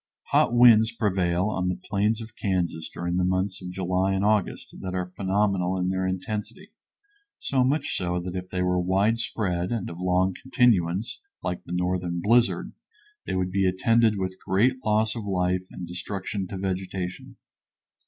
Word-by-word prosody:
Hot - - +4
winds 115 -2 +6
prevail 95 -5 0
on 90 -3 -1
the 90 - -1
plains 105 +4 0
of 110 0 -10
Kansas 90 -5 -1
during 85 +1 -3
the 90 - +2
months 95 +1 0
of 90 - -6
July 95 +1 0
and 95 +1 0
August 105 -2 0
that 95 0 -4
are 90 0 -1
phenomenal 95 0 0
in 90 0 0
their 95 0 0
intensity, 105 - -4 0.7
so 130 -2 +1
much 140 +5 0
so 90 -1 -1
that 90 0 -5
if 90 0 -5
they 90 -1 -1
were 90 0 +1
widespread 95 -1 0
and 115 -7 -2
of 85 - -9
long 90 +1 +2
continuance, 110 -6 +1 0.2
like 90 - -3
the - - -10
northern 90 -1 -1
blizzard, 115 +6 +2 0.5
they - - -1
would 90 0 -1
be 95 0 +2
attended 110 +4 +3
with 95 -1 -3
great 125 +7 +2
loss 110 +1 +1
of 115 - -4
life 90 -2 0
and 90 - -7
destruction 95 +2 -4
to 95 - -6
vegetation. 95 -1 -4
95 Hz, 165 wpm, -26 LUFS, 90-105 Hz, 0.7 s, winds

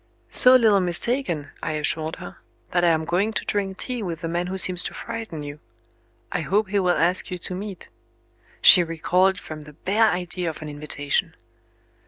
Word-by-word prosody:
"So 255 -1 +7
little 220 -5 +5
mistaken," 180 - -1
I 155 - -3
assured 155 +1 -1
her, 180 - -10 0.3
"that 175 -1 +1
I - - +4
am 160 -1 +2
going 185 +7 0
to - - -3
drink 195 -2 -2
tea 250 +2 -4
with 170 -5 -5
the 165 - -3
man 175 +2 -2
who 190 +1 -4
seems 185 -1 +4
to - - -6
frighten 225 -9 -6
you. 145 +1 -8 0.7
I - - -1
hope 190 +7 0
he 200 0 +1
will 180 -2 +1
ask 175 +3 +2
you 180 - -4
to 180 - -4
meet 195 +1 -7 0.4
" - - -40 0.3
She 180 - +9
recoiled 180 +3 +1
from 155 -3 -9
the 150 0 -13
bare 210 +8 +2
idea 180 -1 -3
of 155 - -8
an 155 - -7
invitation. 145 -1 -3
180 Hz, 195 wpm, -23 LUFS, 160-200 Hz, 0.7 s, She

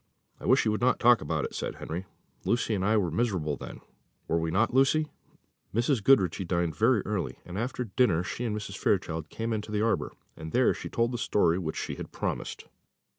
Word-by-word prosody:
"I - - -6
wish - - +4
you 110 - +3
would 105 - -2
not 125 +1 +3
talk 120 -1 +6
about 75 - -1
it," - - -6
said - - -3
Henry; 85 +4 -5 0.4
"Lucy 120 -1 +1
and 95 -3 0
I 110 +3 +3
were 90 -5 +1
miserable 85 -6 0
then; - - -9 0.5
were 80 0 0
not 95 +7 +2
we, - - -5
Lucy?" 150 +3 +2 0.6
Mrs. 120 -1 +2
Goodriche 95 -8 +3
dined 85 -3 0
very 115 +1 +3
early, 105 -4 -2
and 90 - -8
after 125 +4 -2
dinner 100 -6 +2
she 120 - -4
and 110 -3 -1
Mrs. 100 -2 -6
Fairchild 80 -5 0
came 115 0 -3
into 105 0 -4
the 105 0 +1
arbour, 115 - 0 0.2
and 80 0 -8
there 125 +1 +4
she - - -7
told 115 +1 +1
the 120 - -3
story 90 -5 +2
which 80 -4 -4
she - - -4
had - - -7
promised. - - -4
105 Hz, 210 wpm, -28 LUFS, 85-120 Hz, 0.6 s, talk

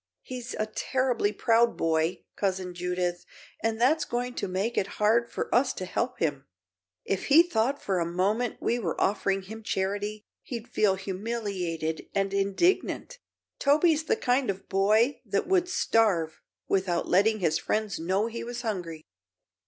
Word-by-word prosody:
He's 250 -1 -6
a 215 - -1
terribly 245 0 0
proud 230 +2 +2
boy, 160 +1 0
Cousin 190 -2 -1
Judith, 180 0 -2 0.4
and 225 0 -1
that's 295 +6 +3
going 245 -2 -3
to - - -3
make 195 +6 -1
it 200 +1 -2
hard 230 +3 +3
for - - -4
us 255 +2 +3
to 185 - -5
help 235 +7 -2
him. 145 -4 -2 0.6
If 195 - -1
he 310 +4 +7
thought 275 -4 0
for 190 -2 -1
a 170 - 0
moment 210 +7 0
we 240 - 0
were 175 -8 -3
offering 195 -1 +1
him 220 +4 -9
charity, 205 +1 -2 0.2
he'd 235 -2 -6
feel 210 -5 +2
humiliated 190 -5 -3
and 195 0 0
indignant. 340 - 0 0.4
Toby's 310 +2 +3
the 450 - +2
kind 250 - +1
of 195 0 -4
boy 215 +7 +2
that 200 -4 -1
would 360 -1 +2
starve 200 - +1 0.3
without 185 -3 0
letting 215 +4 +3
his 165 -4 +1
friends 215 -5 -1
know 190 +6 +1
he 230 0 -5
was 240 +1 -5
hungry." 175 -8 -4
210 Hz, 155 wpm, -28 LUFS, 185-240 Hz, 0.6 s, he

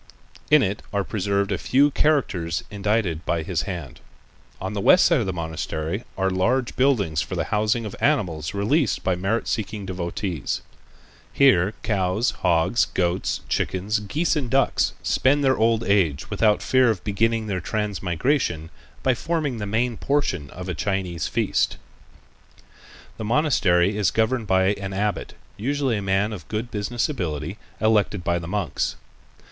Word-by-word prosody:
In 150 -2 +6
it 100 +2 -2
are 100 -2 0
preserved 100 0 -1
a 95 - -1
few 140 +3 +3
characters 95 - +1
indited 100 -5 0
by 85 -2 -1
his 85 -2 -1
hand. 85 -9 -6 0.6
On 95 +2 -4
the 100 - -2
west 180 - +6
side 170 - +4
of 110 - -1
the - - 0
monastery 80 - -4
are 95 0 +1
large 120 +7 0
buildings 105 - +2
for - - -4
the - - 0
housing 110 +2 +1
of 105 - -6
animals 90 - +1
released 130 +9 +1
by 95 - +1
merit 95 +6 -1
seeking 105 -1 -3
devotees. 90 -3 -3 0.7
Here 110 -8 +4
cows, 100 +2 +1
hogs, 90 +5 +2
goats, 90 0 -1
chickens, 100 +4 -1
geese 150 - 0
and 140 -5 -2
ducks 135 +1 +2
spend 145 +2 +2
their 130 -1 +4
old 115 0 +2
age 90 -9 +1
without 105 0 +2
fear 130 -2 +4
of 110 -5 -1
beginning 115 +2 +1
their 95 -4 -2
transmigration 95 - -1 0.3
by 130 - +3
forming 150 -3 -2
the 105 - -3
main 115 +2 0
portion 95 - -1
of 90 +4 -8
a 90 - -2
Chinese 90 -2 -2
feast. - - 0 1.4
The - - -5
monastery 105 - +2
is 105 -4 +2
governed 110 +2 0
by 95 0 +3
an 100 -1 -6
abbot, 105 +2 -2 0.2
usually 135 +2 0
a - - -3
man 100 +2 +1
of 90 -7 -9
good 110 +3 -4
business 110 +3 -1
ability, 85 - -4 0.2
elected 105 -3 +2
by 85 0 0
the 85 - -7
monks. 100 +2 -2
100 Hz, 155 wpm, -23 LUFS, 90-115 Hz, 1.4 s, In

